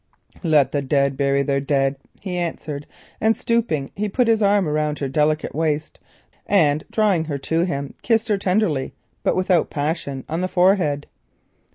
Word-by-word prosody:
"Let 150 -6 +3
the 145 - 0
dead 140 0 +1
bury 140 0 +1
their 140 -1 0
dead," 135 -1 +1 0.3
he 185 -3 -4
answered, 155 -4 -4 0.3
and 220 +1 +3
stooping 215 -13 -1
he 210 +1 -2
put 245 +4 +1
his 225 -1 +3
arm 200 -3 +3
round 150 0 0
her 140 - -2
delicate 150 +3 0
waist 155 0 -2 0.5
and 155 -6 +3
drawing 200 -7 +2
her 145 -3 -3
to 165 +5 0
him 140 -5 -4
kissed 225 -1 +1
her 205 -2 +2
tenderly 180 -8 0 0.3
but - - +1
without 185 -3 +2
passion 145 -3 -3
on 165 +3 -2
her 185 - 0
forehead. 180 -6 +2
155 Hz, 165 wpm, -22 LUFS, 140-190 Hz, 0.5 s, Let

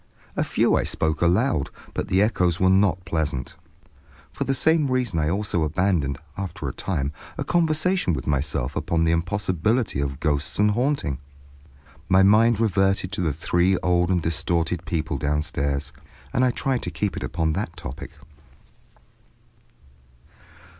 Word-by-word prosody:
A - - +1
few - - +2
I - - +2
spoke 80 -1 -1
aloud, 90 - +2 0.2
but - - -3
the 95 +2 +3
echoes 90 -5 +1
were 95 0 +4
not 95 -2 +2
pleasant* 75 -5 -2 0.8
For - - -3
the 135 - +1
same 160 -1 +2
reason 125 -9 0
I 75 0 +1
also 95 -1 -1
abandoned, 80 -3 0 0.2
after 95 -4 -5
a - - -4
time, 75 -7 -2 0.3
a - - -1
conversation 170 - +1
with - - -4
myself 70 -3 -1
upon 85 -1 0
the 80 - +3
impossibility 95 - 0
of 70 -1 -2
ghosts 75 -2 0
and 105 +1 +4
haunting. 120 - 0 0.9
My 95 0 +6
mind 110 +3 +5
reverted 95 -3 +1
to 100 - -2
the 80 -3 +1
three 85 +5 +1
old 90 -1 +2
and 90 -3 +1
distorted 85 +1 -1
people 80 -3 -2
downstairs, 70 -1 -1 0.4
and 125 - +2
I 130 - +4
tried 130 +1 -1
to - - -4
keep 95 +4 -2
it - - -5
upon 80 -2 -1
that 85 -3 -4
topic. 70 -4 -7
90 Hz, 150 wpm, -24 LUFS, 80-105 Hz, 0.9 s, My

